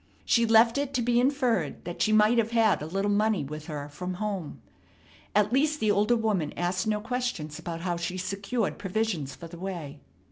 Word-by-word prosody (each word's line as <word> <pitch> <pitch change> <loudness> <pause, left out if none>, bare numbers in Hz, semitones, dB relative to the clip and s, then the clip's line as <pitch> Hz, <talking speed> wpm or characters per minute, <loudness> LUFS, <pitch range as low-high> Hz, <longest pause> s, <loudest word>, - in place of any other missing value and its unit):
She 235 -1 +3
left 230 +3 +5
it 280 -1 -3
to 250 - +2
be 240 0 +3
inferred 250 - 0
that 175 0 -5
she 215 - +3
might 215 +2 +5
have 225 -1 +1
had 225 -6 +3
a 150 - -4
little 195 +4 -1
money 210 -4 +2
with 150 +3 -7
her 145 -3 -5
from 180 +5 -5
home. 195 -5 -4 0.8
At 210 +2 +3
least, 300 +3 +2
the 215 -1 +2
older 210 +4 +3
woman 210 -9 -1
asked 180 +3 -1
no 210 -1 +1
questions 225 -10 -3
about 165 -1 -5
how 175 -1 -1
she 175 +2 -3
secured 200 +4 -2
provisions 190 -8 -2
for - - -10
the 170 0 -11
way. 170 -6 -6
205 Hz, 200 wpm, -27 LUFS, 170-230 Hz, 0.8 s, left